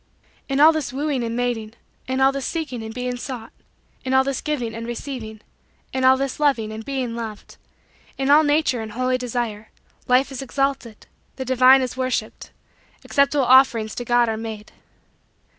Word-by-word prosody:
In 270 0 0
all 310 +2 +8
this 315 -3 -3
wooing 275 -1 -2
and 230 0 -3
mating; 235 -3 -2 0.3
in 260 +1 -1
all 270 0 +5
this 275 -2 -4
seeking 295 -8 -4
and 220 0 -7
being 250 +1 -4
sought; 245 -3 -7 0.5
in 265 0 0
all 265 - +5
this 275 0 -3
giving 255 -7 -3
and 230 +1 -6
receiving; 235 -3 -6 0.5
in 260 0 -1
all 260 0 +6
this 275 +1 -3
loving 255 -8 +1
and 220 +1 -7
being 255 -2 -3
loved; 220 -3 -8 0.6
in 270 +1 +1
all 300 +2 +7
natural 295 -5 +1
and 215 -1 -7
holy 255 +2 0
desire; 235 -3 -4 0.4
Life 255 +2 +3
is 270 - -5
exalted 270 -4 -2 0.3
the 260 - -5
divine 260 +1 +5
is 250 - -4
worshiped 255 -1 -3 0.5
acceptable 280 -1 +2
offerings 245 -4 +4
to 245 - -5
God 240 0 +3
are 220 -1 -2
made. 220 -1 -7
255 Hz, 175 wpm, -22 LUFS, 230-270 Hz, 0.6 s, all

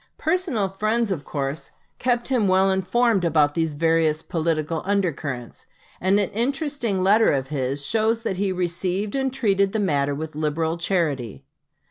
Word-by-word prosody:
Personal 320 - 0
friends, 215 +3 -1
of 160 -7 -2
course, 140 +2 -4 0.3
kept 240 0 0
him 245 -6 +2
well 190 +1 +4
informed 195 +2 +2
about 150 -3 +3
these 160 -2 -1
various 160 0 +2
political 160 -1 -1
under 200 -2 +1
currents, 130 -5 -7 0.3
and 190 +3 +3
an 200 - -1
interesting 240 -4 -1
letter 210 +4 +5
of 135 -2 -1
his 140 0 -2
shows 225 +3 +1
that 190 -5 -2
he 195 0 0
received 185 +3 -2
and 270 -1 0
treated 200 -6 +1
the 220 - 0
matter 145 -7 +1
with 155 +2 -5
liberal 155 +2 -1
charity. 145 - -2
185 Hz, 155 wpm, -23 LUFS, 155-215 Hz, 0.3 s, letter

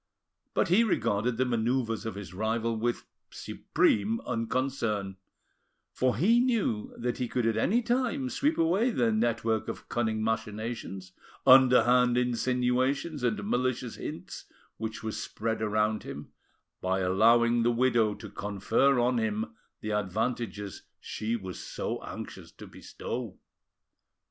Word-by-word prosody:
But - - +2
he 195 +7 +5
regarded 115 - 0
the 130 - +2
manoeuvres 120 -1 0
of 110 - -4
his 100 -2 -8
rival 110 +3 -1
with 120 +2 -2 0.2
supreme 110 +2 0
unconcern, 115 -5 -2 0.8
for 130 -1 +1
he 225 +9 +4
knew 230 - 0
that 120 0 -2
he 125 - -1
could 120 +1 -1
at 115 -1 +2
any 215 - +2
time 255 +3 0
sweep 280 +4 0
away 185 +9 +3
the 120 - +1
network 110 0 0
of - - -7
cunning 110 -2 0
machinations, 110 -3 -3 0.3
underhand 125 -1 +6
insinuations, 125 +4 0
and 110 -4 -1
malicious 125 -1 -1
hints, - - -7 0.3
which 110 0 -5
was 110 -1 -3
spread 110 0 -3
around 110 0 +1
him, - - -8 0.5
by 95 +1 0
allowing 115 +5 +4
the 115 - +3
widow 120 -3 +2
to 100 - -9
confer 110 +7 +1
on 120 0 +2
him 215 - -2 0.3
the 110 - -3
advantages 105 0 -2 0.2
she 110 +2 -3
was 95 -5 -6
so - - -4
anxious - - -8
to - - -11
bestow. 115 -6 -6
115 Hz, 130 wpm, -29 LUFS, 110-130 Hz, 0.8 s, underhand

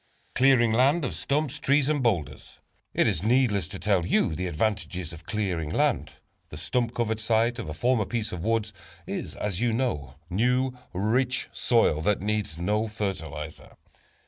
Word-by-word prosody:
= - - -36
Clearing 130 -3 +5
Land 135 +7 +3
of - - -3
Stumps, 150 0 -1
Boulders 140 -1 +3
and 120 - +2
Trees. - - -14 0.4
It - - +4
is 75 - 0
needless 110 -6 +2
to 95 +2 -7
tell 100 -3 +1
you 85 -1 +2
the 90 +3 -2
advantages 90 -1 -2
of 85 0 -12
clearing 90 -8 -1
land. - - +1 0.4
The - - -8
stump 120 -2 -1
covered 110 -2 0
site 115 +2 +1
of - - -5
a - - -4
former 120 -1 +2
piece 110 0 -3
of 85 -2 -5
woods, 110 0 0 0.3
is, - - -5
as 105 -1 -3
you 120 -2 +2
know, 115 - -2
new, 125 +6 +1 0.2
rich 125 +7 0
soil 115 -10 +2
that 105 +4 +2
needs 105 -6 -1
no 105 +6 0
fertilizer. 80 -8 -5
110 Hz, 170 wpm, -27 LUFS, 90-125 Hz, 0.4 s, Clearing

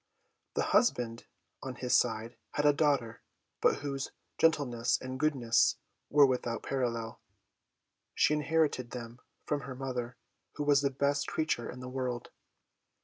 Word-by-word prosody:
The - - +1
husband, 120 - +2 0.3
on 130 -1 -5
his 125 0 +1
side, 115 0 +1 0.2
had 145 - 0
a 145 - +6
daughter, 140 -7 +1 0.4
but - - +3
whose 140 -1 -3 0.3
gentleness 125 -7 +2
and 130 0 -6
goodness 120 -7 +3 0.3
were 145 -1 +7
without 125 -3 -1
parallel. 115 -4 -2 0.9
She - - +4
inherited 150 -4 +1
them 120 -1 -8 0.3
from 145 -1 -1
her 130 0 -7
mother, 125 -2 -4 0.4
who 150 - -2
was 145 -1 +4
the 140 - +2
best 140 +1 0
creature 155 -7 -1
in 125 - -8
the 125 - -6
world. 125 -2 -3
130 Hz, 140 wpm, -31 LUFS, 120-145 Hz, 0.9 s, were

